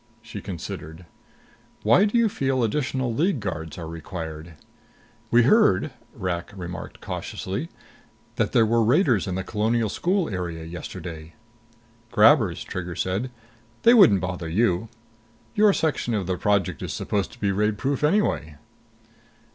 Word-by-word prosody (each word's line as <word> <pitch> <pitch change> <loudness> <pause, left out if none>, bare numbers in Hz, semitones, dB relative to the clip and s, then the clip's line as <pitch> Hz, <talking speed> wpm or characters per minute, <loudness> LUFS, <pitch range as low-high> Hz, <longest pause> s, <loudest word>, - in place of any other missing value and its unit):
She - - -8
considered. 85 -2 -7 0.8
"Why 120 - +5
do 215 +3 +1
you 235 -1 +4
feel 135 - 0
additional 130 0 -1
League 155 - +1
guards 80 -6 -5
are 85 -2 -6
required?" 80 -1 -7 0.8
"We 120 0 +5
heard," 125 - +4 0.2
Rak 90 -1 -3
remarked 90 -2 -7
cautiously, - - -4 0.7
"that - - +1
there 115 - +4
were 115 +1 +2
raiders 120 - +3
in 90 - -2
the 95 - -2
Colonial 110 +2 0
School 180 - 0
area 85 -4 -4
yesterday." 80 -1 -8 0.7
"Grabbers," 110 - +4
Trigger 90 -2 -5
said. 95 +7 -1 0.5
"They 235 - +7
wouldn't 180 - +7
bother 90 -2 -4
you. 95 +2 +1 0.6
Your 210 -2 +5
section 150 - 0
of 100 -3 -1
the 90 +1 -1
project 100 -1 0
is - - -4
supposed 100 -2 -2
to 120 - -16
be 100 -3 +1
raidproof 105 +7 0
anyway." 150 - +1
105 Hz, 135 wpm, -24 LUFS, 90-130 Hz, 0.8 s, They